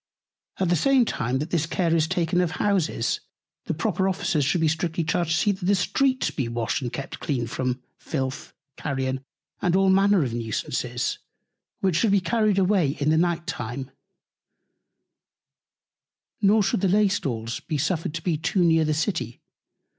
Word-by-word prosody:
At 185 Hz, -2 st, 0 dB
the 175 Hz, -, +4 dB
same 260 Hz, -, +4 dB
time, 125 Hz, -, -1 dB
that 150 Hz, +5 st, -4 dB
this 165 Hz, -2 st, +1 dB
Care 165 Hz, -1 st, +1 dB
is 160 Hz, -1 st, +2 dB
taken 175 Hz, +1 st, +1 dB
of 175 Hz, -2 st, -1 dB
Houses, 195 Hz, -6 st, 0 dB, 0.5 s
the -, -, -1 dB
proper 190 Hz, -1 st, 0 dB
Officers 175 Hz, -5 st, 0 dB
should 140 Hz, +5 st, +1 dB
be 160 Hz, -, +3 dB
strictly 165 Hz, +1 st, -1 dB
charged 165 Hz, +1 st, 0 dB
to 160 Hz, -, +2 dB
see 205 Hz, +6 st, +3 dB
that 190 Hz, -1 st, -6 dB
the 200 Hz, +3 st, +3 dB
Streets 260 Hz, +8 st, +1 dB
be 135 Hz, -5 st, -2 dB
washed 115 Hz, +1 st, -2 dB
and 120 Hz, -3 st, -3 dB
kept 140 Hz, -, -6 dB
clean 130 Hz, -5 st, -1 dB
from 125 Hz, +1 st, -3 dB, 0.2 s
Filth, 130 Hz, -3 st, -4 dB, 0.3 s
Carrion, 130 Hz, -1 st, -2 dB, 0.4 s
and 175 Hz, 0 st, +2 dB
all 190 Hz, 0 st, +4 dB
Manner 195 Hz, -2 st, +4 dB
of 120 Hz, -4 st, -3 dB
Nusances; 120 Hz, +2 st, -2 dB, 0.6 s
which 185 Hz, -4 st, +2 dB
should 225 Hz, -, +3 dB
be 200 Hz, -, +5 dB
carried 215 Hz, +1 st, +1 dB
away 185 Hz, -7 st, +2 dB
in 145 Hz, +2 st, +2 dB
the -, -, +4 dB
Night 170 Hz, 0 st, +1 dB
Time; 130 Hz, -4 st, -5 dB, 2.5 s
nor 210 Hz, +1 st, +4 dB
should 190 Hz, -, 0 dB
the 195 Hz, -, +3 dB
Laystalls 160 Hz, -, 0 dB
be 155 Hz, -, -3 dB
suffered 160 Hz, +1 st, -1 dB
to 165 Hz, -, -5 dB
be 170 Hz, -4 st, 0 dB
too 180 Hz, +4 st, +1 dB
near 165 Hz, -1 st, +4 dB
the 155 Hz, -1 st, 0 dB
City. 160 Hz, -, -2 dB
165 Hz, 170 wpm, -25 LUFS, 135-190 Hz, 2.5 s, be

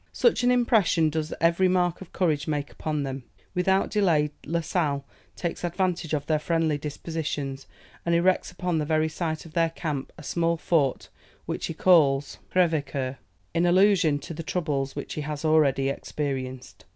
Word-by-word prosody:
Such 470 Hz, -, +3 dB
an 245 Hz, -, +4 dB
impression 220 Hz, -10 st, +3 dB
does 155 Hz, 0 st, -2 dB
every 170 Hz, +3 st, +3 dB
mark 180 Hz, -1 st, +1 dB
of 190 Hz, -, -10 dB
courage 155 Hz, -5 st, 0 dB
make 145 Hz, -2 st, -2 dB
upon 150 Hz, -2 st, -2 dB
them! 135 Hz, -1 st, -5 dB, 0.3 s
Without 190 Hz, +2 st, +2 dB
delay, 165 Hz, -8 st, +2 dB, 0.2 s
La 170 Hz, +2 st, 0 dB
Sale 145 Hz, -5 st, -1 dB, 0.3 s
takes 170 Hz, 0 st, -4 dB
advantage 175 Hz, -2 st, -1 dB
of 145 Hz, -1 st, -3 dB
their 155 Hz, -1 st, +1 dB
friendly 160 Hz, -2 st, 0 dB
dispositions, 145 Hz, -2 st, -4 dB, 0.4 s
and 170 Hz, 0 st, +1 dB
erects 180 Hz, +2 st, +2 dB
upon 180 Hz, -2 st, -2 dB
the 150 Hz, -, -1 dB
very 155 Hz, 0 st, +2 dB
site 160 Hz, 0 st, -3 dB
of 160 Hz, -, -13 dB
their 165 Hz, -1 st, +2 dB
camp, 150 Hz, -4 st, -4 dB
a -, -, -11 dB
small 170 Hz, -1 st, 0 dB
fort, 150 Hz, -5 st, 0 dB, 0.4 s
which -, -, -3 dB
he 165 Hz, -, -5 dB
calls 145 Hz, -6 st, +3 dB
Crèvecoeur, 145 Hz, -7 st, 0 dB, 0.4 s
in 170 Hz, +1 st, +2 dB
allusion 180 Hz, -4 st, +4 dB
to 155 Hz, -, -7 dB
the 165 Hz, -, -5 dB
troubles 150 Hz, -5 st, -2 dB
which -, -, -5 dB
he 150 Hz, -, -3 dB
has 150 Hz, +1 st, -4 dB
already 140 Hz, -4 st, +3 dB
experienced. 130 Hz, -3 st, -5 dB
160 Hz, 165 wpm, -26 LUFS, 145-175 Hz, 0.4 s, an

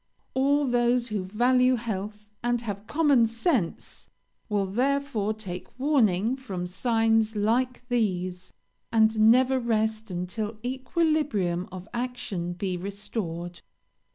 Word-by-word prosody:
'All 285 Hz, +2 st, +2 dB
those 245 Hz, -1 st, +2 dB
who 205 Hz, -3 st, -2 dB
value 250 Hz, +5 st, +3 dB
health, 210 Hz, -2 st, -5 dB
and 240 Hz, -1 st, +1 dB
have 205 Hz, -2 st, -6 dB
common 290 Hz, -7 st, +4 dB
sense, 230 Hz, -, -2 dB, 0.4 s
will 205 Hz, -2 st, +1 dB
therefore 245 Hz, 0 st, 0 dB
take 195 Hz, -2 st, -7 dB
warning 240 Hz, -6 st, +2 dB
from 195 Hz, -10 st, -5 dB
signs 225 Hz, +3 st, +1 dB
like 245 Hz, +4 st, 0 dB
these, 185 Hz, -7 st, -1 dB, 0.4 s
and 220 Hz, -1 st, +4 dB
never 260 Hz, +2 st, +4 dB
rest 220 Hz, -2 st, 0 dB
until 190 Hz, +5 st, -4 dB
equilibrium 260 Hz, -, 0 dB
of 185 Hz, +1 st, -8 dB
action 235 Hz, -8 st, -3 dB
be 185 Hz, +1 st, -3 dB
restored.' 185 Hz, -3 st, -5 dB
220 Hz, 110 wpm, -27 LUFS, 195-250 Hz, 0.4 s, common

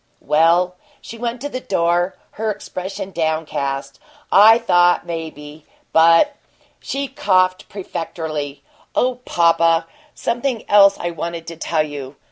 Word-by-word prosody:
"Well 170 Hz, +4 st, +3 dB
" -, -, -32 dB
She 230 Hz, -, -10 dB
went 240 Hz, +1 st, -3 dB
to 290 Hz, -, -3 dB
the 255 Hz, -, -4 dB
door, 175 Hz, -3 st, 0 dB, 0.2 s
her 220 Hz, +1 st, -3 dB
expression 195 Hz, -2 st, -6 dB
downcast. 155 Hz, -5 st, -3 dB, 0.3 s
"I 220 Hz, +3 st, +8 dB
thought 175 Hz, -6 st, +3 dB
maybe 155 Hz, -3 st, -8 dB, 0.3 s
but 165 Hz, -, +5 dB, 0.2 s
" -, -, -36 dB
She 275 Hz, 0 st, -2 dB
coughed 185 Hz, -5 st, +1 dB
prefatorily. 160 Hz, -6 st, -5 dB, 0.3 s
"Oh, 250 Hz, 0 st, +1 dB
papa, 165 Hz, -1 st, +3 dB, 0.3 s
something 240 Hz, -1 st, -2 dB
else 200 Hz, -1 st, +6 dB
I 175 Hz, -, -3 dB
wanted 170 Hz, 0 st, -5 dB
to 165 Hz, -, -8 dB
tell 160 Hz, -1 st, 0 dB
you. 145 Hz, -2 st, -8 dB
175 Hz, 130 wpm, -19 LUFS, 160-205 Hz, 0.3 s, I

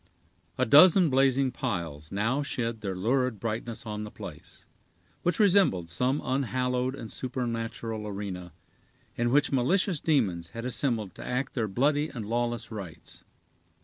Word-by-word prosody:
A 130 Hz, -, +2 dB
dozen 165 Hz, -, +7 dB
blazing 135 Hz, 0 st, +3 dB
piles 85 Hz, -, -4 dB
now 115 Hz, +8 st, 0 dB
shed 115 Hz, -5 st, -3 dB
their 95 Hz, -3 st, -3 dB
lurid 125 Hz, +3 st, 0 dB
brightness 115 Hz, +1 st, -4 dB
on 105 Hz, -1 st, -4 dB
the 105 Hz, -, -6 dB
place, -, -, -11 dB, 0.6 s
which 175 Hz, -1 st, +1 dB
resembled 185 Hz, -, +4 dB
some 125 Hz, -, 0 dB
unhallowed 130 Hz, -1 st, 0 dB
and 115 Hz, -5 st, -8 dB
supernatural 115 Hz, -3 st, -4 dB
arena, 95 Hz, -3 st, -5 dB, 0.6 s
in 120 Hz, 0 st, +1 dB
which 145 Hz, +3 st, +3 dB
malicious 170 Hz, +6 st, +2 dB
demons 100 Hz, -, +1 dB
had 115 Hz, -, -4 dB
assembled 115 Hz, -6 st, -1 dB
to -, -, -9 dB
act 125 Hz, +2 st, -2 dB
their 115 Hz, -4 st, -1 dB
bloody 145 Hz, +8 st, +1 dB
and 115 Hz, -5 st, -6 dB
lawless 120 Hz, +1 st, -2 dB
rites. 95 Hz, -7 st, -9 dB
120 Hz, 140 wpm, -28 LUFS, 105-135 Hz, 0.6 s, dozen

